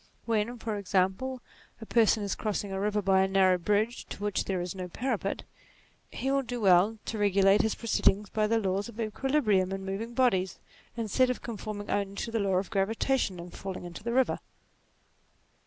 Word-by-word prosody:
When, 230 Hz, +1 st, 0 dB
for 220 Hz, -2 st, -3 dB
example, 200 Hz, +7 st, 0 dB, 0.4 s
a 225 Hz, -, -8 dB
person 220 Hz, -2 st, +3 dB
is 200 Hz, -, -1 dB
crossing 205 Hz, -2 st, -3 dB
a 190 Hz, -, -2 dB
river 210 Hz, +1 st, 0 dB
by 190 Hz, 0 st, +4 dB
a 190 Hz, -, +3 dB
narrow 190 Hz, -1 st, +4 dB
bridge 210 Hz, +6 st, 0 dB
to 205 Hz, -, -8 dB
which 205 Hz, -1 st, 0 dB
there 190 Hz, -2 st, -1 dB
is 175 Hz, 0 st, -3 dB
no 185 Hz, -2 st, -5 dB
parapet, 255 Hz, +9 st, -2 dB, 0.7 s
he 270 Hz, -, -2 dB
will 275 Hz, 0 st, +2 dB
do 245 Hz, -2 st, -5 dB
well 195 Hz, +2 st, +4 dB
to 220 Hz, -, -4 dB
regulate 200 Hz, 0 st, +4 dB
his 220 Hz, -, 0 dB
proceedings 210 Hz, -2 st, +1 dB
by 215 Hz, -1 st, +1 dB
the 230 Hz, +1 st, +2 dB
laws 200 Hz, +1 st, -1 dB
of 235 Hz, 0 st, -12 dB
equilibrium 215 Hz, -4 st, +1 dB
in 195 Hz, 0 st, -4 dB
moving 220 Hz, +5 st, -4 dB
bodies, 190 Hz, -8 st, +2 dB, 0.4 s
instead 235 Hz, +3 st, +2 dB
of 250 Hz, -, -3 dB
conforming 210 Hz, -2 st, -5 dB
only 200 Hz, -1 st, -1 dB
to 230 Hz, -, -4 dB
the 225 Hz, -, 0 dB
law 195 Hz, -2 st, +1 dB
of 190 Hz, +3 st, -1 dB
gravitation, 220 Hz, 0 st, 0 dB
and 175 Hz, +1 st, -9 dB
falling 190 Hz, -2 st, -6 dB
into 175 Hz, +3 st, -9 dB
the 235 Hz, -, -2 dB
river. 255 Hz, +1 st, +2 dB
205 Hz, 190 wpm, -29 LUFS, 190-230 Hz, 0.7 s, by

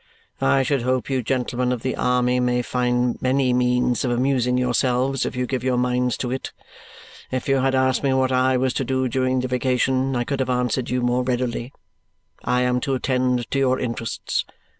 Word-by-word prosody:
I 100 Hz, -, +3 dB
should 135 Hz, 0 st, 0 dB
hope 130 Hz, +2 st, -1 dB
you 130 Hz, -1 st, +1 dB
gentlemen 125 Hz, 0 st, -1 dB
of 125 Hz, -3 st, -3 dB
the 130 Hz, -, -1 dB
army 125 Hz, 0 st, +1 dB
may 125 Hz, 0 st, +1 dB
find 125 Hz, 0 st, 0 dB
many 130 Hz, 0 st, +2 dB
means 125 Hz, -1 st, +1 dB
of 130 Hz, -, 0 dB
amusing 125 Hz, 0 st, +1 dB
yourselves 125 Hz, +2 st, +1 dB
if -, -, -5 dB
you 125 Hz, 0 st, -1 dB
give 125 Hz, -1 st, -3 dB
your 130 Hz, -1 st, +1 dB
minds 125 Hz, -1 st, 0 dB
to 125 Hz, -, -3 dB
it. 130 Hz, -, -4 dB, 0.8 s
If 130 Hz, -1 st, -3 dB
you 135 Hz, -1 st, +3 dB
had 135 Hz, 0 st, +1 dB
asked 130 Hz, 0 st, +2 dB
me 140 Hz, -, +1 dB
what 130 Hz, 0 st, +2 dB
I 130 Hz, 0 st, +2 dB
was 130 Hz, 0 st, 0 dB
to -, -, -1 dB
do 130 Hz, 0 st, 0 dB
during 130 Hz, +1 st, 0 dB
the 130 Hz, -, -2 dB
vacation, 130 Hz, +1 st, 0 dB
I 120 Hz, -, 0 dB
could 140 Hz, +2 st, -3 dB
have 130 Hz, -, -1 dB
answered 125 Hz, 0 st, 0 dB
you 125 Hz, 0 st, -1 dB
more 125 Hz, +1 st, +1 dB
readily. 125 Hz, -1 st, -2 dB, 0.7 s
I 125 Hz, 0 st, +1 dB
am 125 Hz, 0 st, +1 dB
to 135 Hz, +2 st, -1 dB
attend 125 Hz, -2 st, 0 dB
to 135 Hz, -, +1 dB
your 130 Hz, -1 st, +2 dB
interests. 115 Hz, -1 st, -2 dB
125 Hz, 200 wpm, -22 LUFS, 125-130 Hz, 0.8 s, I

